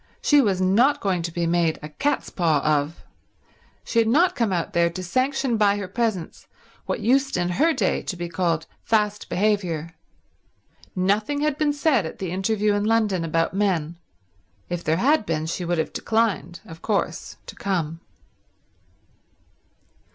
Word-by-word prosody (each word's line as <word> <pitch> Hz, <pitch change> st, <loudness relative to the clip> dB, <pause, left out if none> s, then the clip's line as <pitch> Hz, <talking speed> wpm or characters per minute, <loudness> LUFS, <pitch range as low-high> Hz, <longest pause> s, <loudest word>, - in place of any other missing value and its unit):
She 290 Hz, -1 st, +4 dB
was 200 Hz, -7 st, +1 dB
not 235 Hz, +11 st, +3 dB
going 185 Hz, -3 st, 0 dB
to 170 Hz, 0 st, -4 dB
be 170 Hz, 0 st, -1 dB
made 170 Hz, -1 st, +1 dB
a 150 Hz, -, -6 dB
cat's 285 Hz, -, -1 dB
paw 160 Hz, -5 st, +1 dB
of. 150 Hz, +1 st, 0 dB, 0.8 s
She 230 Hz, -, 0 dB
had 225 Hz, -, +3 dB
not 345 Hz, +10 st, +3 dB
come 230 Hz, -4 st, 0 dB
out 175 Hz, -2 st, -2 dB
there 170 Hz, 0 st, +3 dB
to 185 Hz, +2 st, -6 dB
sanction 255 Hz, +5 st, 0 dB
by 205 Hz, -1 st, +3 dB
her 200 Hz, -2 st, -4 dB
presence 200 Hz, -4 st, -3 dB, 0.4 s
what -, -, -2 dB
used 270 Hz, +4 st, +2 dB
in 175 Hz, 0 st, 0 dB
her 300 Hz, -, +2 dB
day 210 Hz, -, 0 dB
to 180 Hz, -, -5 dB
be 175 Hz, 0 st, -4 dB
called 170 Hz, -2 st, -1 dB, 0.2 s
fast 210 Hz, -2 st, 0 dB
behaviour. 180 Hz, -5 st, 0 dB, 1.0 s
Nothing 210 Hz, +10 st, 0 dB
had 300 Hz, -1 st, +1 dB
been 295 Hz, 0 st, +1 dB
said 285 Hz, -, +1 dB
at -, -, -9 dB
the 185 Hz, -3 st, -4 dB
interview 205 Hz, +3 st, +1 dB
in 205 Hz, 0 st, 0 dB
London 215 Hz, -5 st, +1 dB
about 165 Hz, +1 st, 0 dB
men; 175 Hz, -5 st, -1 dB, 0.7 s
if 175 Hz, -1 st, -3 dB
there 160 Hz, +1 st, +1 dB
had 280 Hz, -, +3 dB
been 160 Hz, -5 st, -2 dB
she 170 Hz, +2 st, -3 dB
would 175 Hz, 0 st, -1 dB
have 160 Hz, -, -2 dB
declined, 210 Hz, -7 st, -1 dB
of 165 Hz, 0 st, -12 dB
course 210 Hz, -3 st, -2 dB
to -, -, -10 dB
come. 165 Hz, -5 st, -2 dB
190 Hz, 165 wpm, -23 LUFS, 170-225 Hz, 1.0 s, She